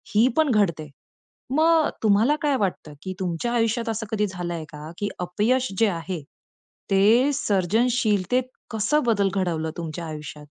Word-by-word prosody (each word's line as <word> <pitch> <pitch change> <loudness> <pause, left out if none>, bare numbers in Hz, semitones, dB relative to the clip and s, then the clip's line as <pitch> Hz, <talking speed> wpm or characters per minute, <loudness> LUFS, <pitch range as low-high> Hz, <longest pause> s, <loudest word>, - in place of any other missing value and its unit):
ही 230 +4 +6
पण 315 -3 +4
घडते. 170 -9 +1 0.7
मग 320 0 +4
तुम्हाला 220 +7 +4
काय 290 -2 +2
वाटतं, 185 -8 -2
की 185 - -5
तुमच्या 185 +5 -2
आयुष्यात 230 0 0
असं 225 0 -2
कधी 210 -1 +1
झाल 180 -2 -5
आहे 165 -2 -4
का? 150 0 -9
की 205 -1 -2
अपयश 215 +9 +1
जे 225 - +5
आहे, 170 -1 -4 0.7
ते 220 +8 +5
सर्जनशीलतेत 220 - +1 0.3
कसं 225 +8 +1
बदल 205 -4 +2
घडवलं 165 -4 -1
तुमच्या 170 0 -5
आयुष्यात? 150 -1 -8
205 Hz, 145 wpm, -24 LUFS, 175-240 Hz, 0.7 s, ही